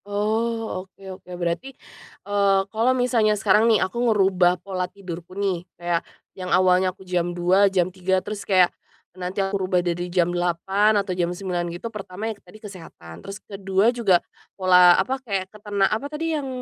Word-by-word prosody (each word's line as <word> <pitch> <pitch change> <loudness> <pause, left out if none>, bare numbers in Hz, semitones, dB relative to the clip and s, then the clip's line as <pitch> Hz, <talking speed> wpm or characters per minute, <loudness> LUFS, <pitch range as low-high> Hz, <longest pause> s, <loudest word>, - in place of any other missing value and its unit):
Oh, 220 0 -1
oke 190 +1 -19 0.2
oke, - - -21
berarti, 175 +10 -3 0.5
eee, 200 -1 +2
kalau 230 +4 +2
misalnya 230 -4 +2
sekarang 215 +3 +3
nih, 220 - +5
aku 235 +6 -4
ngerubah 190 -4 +3
pola 185 -1 -4
tidurku 185 -2 -9
nih, 195 -4 -1 0.2
kayak 175 -1 -1 0.3
yang 185 -1 -7
awalnya 185 0 +4
aku 190 +1 -12
jam 175 -1 -1
02:00, 190 +3 +4
jam 185 -1 0
03:00, 190 0 0
terus 210 -1 -5
kayak 185 -3 +3 0.4
nanti 185 +2 -3
aku 195 +1 -2
rubah 185 -1 +1
dari 175 0 -2
jam 175 -1 +1
08:00 190 +5 +1
atau 195 -2 -1
jam 175 -1 0
09:00, 175 -1 -3
gitu, 185 +7 -7
pertama 200 0 -7
yang 225 - -2
tadi - - -16
kesehatan, 170 - -12
terus 195 0 -8
ke-2 195 +3 +1
juga 200 -8 +2 0.3
pola, 180 -2 +6
apa, 260 +7 -1
kayak 195 -6 -4
ketena 205 -2 -1
apa, 215 +7 -1
tadi 320 +2 -3
yang 290 -3 -2
190 Hz, 175 wpm, -23 LUFS, 180-210 Hz, 0.5 s, pola